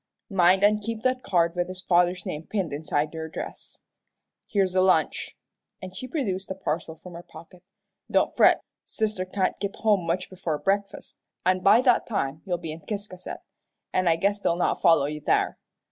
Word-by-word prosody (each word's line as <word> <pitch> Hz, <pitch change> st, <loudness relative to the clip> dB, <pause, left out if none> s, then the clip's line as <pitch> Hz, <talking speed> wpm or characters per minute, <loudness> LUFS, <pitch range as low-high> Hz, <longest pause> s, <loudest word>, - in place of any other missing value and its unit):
Mind 190 Hz, +1 st, +4 dB
an' 210 Hz, +1 st, +5 dB
keep 220 Hz, +1 st, -5 dB
that 255 Hz, 0 st, +1 dB
card 170 Hz, -5 st, +2 dB
with 175 Hz, 0 st, 0 dB
his 185 Hz, 0 st, -8 dB
father's 180 Hz, 0 st, +2 dB
name 155 Hz, +2 st, -5 dB
pinned 190 Hz, -8 st, -2 dB
inside 150 Hz, +1 st, -1 dB
your 160 Hz, 0 st, -5 dB
dress. -, -, -8 dB, 0.7 s
Here's 195 Hz, -3 st, +1 dB
a 185 Hz, -, +3 dB
lunch," 190 Hz, 0 st, +1 dB, 0.4 s
and 185 Hz, 0 st, -9 dB
she 255 Hz, -, -6 dB
produced 205 Hz, -, -3 dB
a 190 Hz, -, -3 dB
parcel 160 Hz, -3 st, -3 dB
from 175 Hz, +2 st, -12 dB
her 170 Hz, -, -8 dB
pocket. 175 Hz, +1 st, -14 dB, 0.5 s
"Don't -, -, +2 dB
fret, -, -, +5 dB, 0.2 s
sister 215 Hz, -4 st, -2 dB
can't 185 Hz, 0 st, -1 dB
git 200 Hz, 0 st, -3 dB
home 205 Hz, -6 st, +1 dB
much 180 Hz, +2 st, -1 dB
before 175 Hz, -5 st, -3 dB
breakfast, 200 Hz, +5 st, -2 dB, 0.3 s
an' 185 Hz, 0 st, +3 dB
by 195 Hz, +6 st, +6 dB
that 250 Hz, -2 st, +3 dB
time 155 Hz, -, -2 dB
you'll 175 Hz, -2 st, 0 dB
be 165 Hz, -2 st, -6 dB
in 160 Hz, +1 st, -8 dB
Ciscasset, 200 Hz, -3 st, -6 dB, 0.5 s
an' 185 Hz, -1 st, +1 dB
I 165 Hz, -, +5 dB
guess 200 Hz, +4 st, 0 dB
they'll 170 Hz, -, +1 dB
not 175 Hz, -, 0 dB
follow 165 Hz, -4 st, +5 dB
you 150 Hz, +1 st, -4 dB
there. -, -, +1 dB
185 Hz, 185 wpm, -26 LUFS, 165-200 Hz, 0.7 s, by